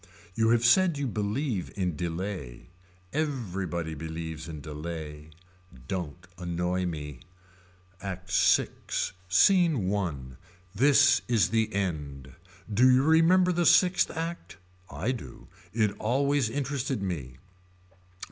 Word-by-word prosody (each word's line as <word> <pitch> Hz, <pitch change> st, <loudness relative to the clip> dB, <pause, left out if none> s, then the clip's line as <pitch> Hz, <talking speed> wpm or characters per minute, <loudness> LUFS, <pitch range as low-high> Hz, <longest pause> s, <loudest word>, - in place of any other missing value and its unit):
You 110 Hz, +3 st, +2 dB
have 120 Hz, 0 st, +3 dB
said 175 Hz, +5 st, +4 dB
you 140 Hz, -, -2 dB
believe 105 Hz, -, -2 dB
in 90 Hz, -4 st, -1 dB
delay. 85 Hz, -4 st, -5 dB, 0.4 s
Everybody 95 Hz, -, -2 dB
believes 80 Hz, 0 st, -6 dB
in 80 Hz, -2 st, -7 dB
delay. 75 Hz, 0 st, -7 dB, 0.6 s
Don't 90 Hz, 0 st, -5 dB
annoy 90 Hz, +1 st, -1 dB
me. 75 Hz, -6 st, -6 dB, 0.8 s
ACT 95 Hz, -2 st, -6 dB
VI. -, -, +4 dB, 0.6 s
SCENE 145 Hz, -, +4 dB
I. 95 Hz, -6 st, -1 dB, 0.6 s
This 140 Hz, +5 st, +5 dB
is 115 Hz, -5 st, +2 dB
the 110 Hz, -1 st, +1 dB
end. 75 Hz, -, -4 dB, 0.4 s
Do 125 Hz, +5 st, +5 dB
you 130 Hz, +1 st, +4 dB
remember 165 Hz, +4 st, +4 dB
the 175 Hz, -2 st, +1 dB
sixth 180 Hz, -1 st, +4 dB
act. 165 Hz, -, -6 dB, 0.3 s
I 90 Hz, -, -2 dB
do. 115 Hz, -, -8 dB, 0.2 s
It 110 Hz, -2 st, +1 dB
always 135 Hz, +2 st, +1 dB
interested 135 Hz, -3 st, -2 dB
me. 70 Hz, -9 st, -4 dB
100 Hz, 110 wpm, -28 LUFS, 85-135 Hz, 0.8 s, This